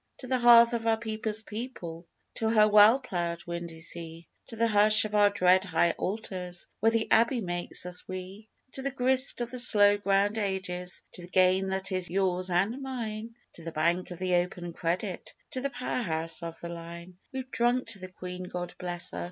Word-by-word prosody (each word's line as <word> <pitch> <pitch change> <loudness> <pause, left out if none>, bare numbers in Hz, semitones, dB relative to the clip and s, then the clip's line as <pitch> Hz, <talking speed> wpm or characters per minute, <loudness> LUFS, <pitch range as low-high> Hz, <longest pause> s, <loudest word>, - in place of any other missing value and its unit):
To - - -9
the 255 0 0
hearth 235 0 +7
of 230 -1 -2
our 225 0 +3
people's 220 -1 -3
people 185 -8 -7 0.3
To 220 - 0
her 215 -1 +5
well 210 +3 +7
ploughed 170 -8 -4
windy 170 -1 -6
sea, 165 0 -8 0.2
To 230 - -8
the 230 +1 +2
hush 215 0 +4
of 210 - -6
our 205 -1 +5
dread 185 -2 +3
high 170 -2 +2
altars 185 -3 -5
Where 225 +2 +3
the 225 -1 0
Abbey 235 +3 +4
makes 175 -3 -2
us 180 0 -4
We; 185 +3 -8 0.2
To 270 - -6
the 275 - -1
grist 260 -1 +2
of 240 - -3
the 250 - -4
slow 205 -4 +7
ground 200 +2 +1
ages, 185 -3 -3
To - - -5
the 175 - -10
gain 185 +1 +3
that 190 0 -2
is 185 -2 -2
yours 185 0 0
and 200 +9 0
mine 230 -4 -5 0.2
To 165 - -12
the 165 - -6
Bank 170 +4 0
of 180 - -8
the 185 0 -1
Open 175 -1 -3
Credit, 180 +3 -3 0.2
To 255 - -3
the 280 - -1
Power 250 -1 -3
house 165 -4 -1
of 165 -1 -7
the 170 - -6
Line! 170 +1 -9
We've 260 -1 -6
drunk 240 +1 +1
to 210 -3 -6
the 185 - -7
Queen 180 0 -8
God 175 -1 -6
bless 175 -1 -4
her! - - -6
190 Hz, 200 wpm, -28 LUFS, 175-225 Hz, 0.3 s, hearth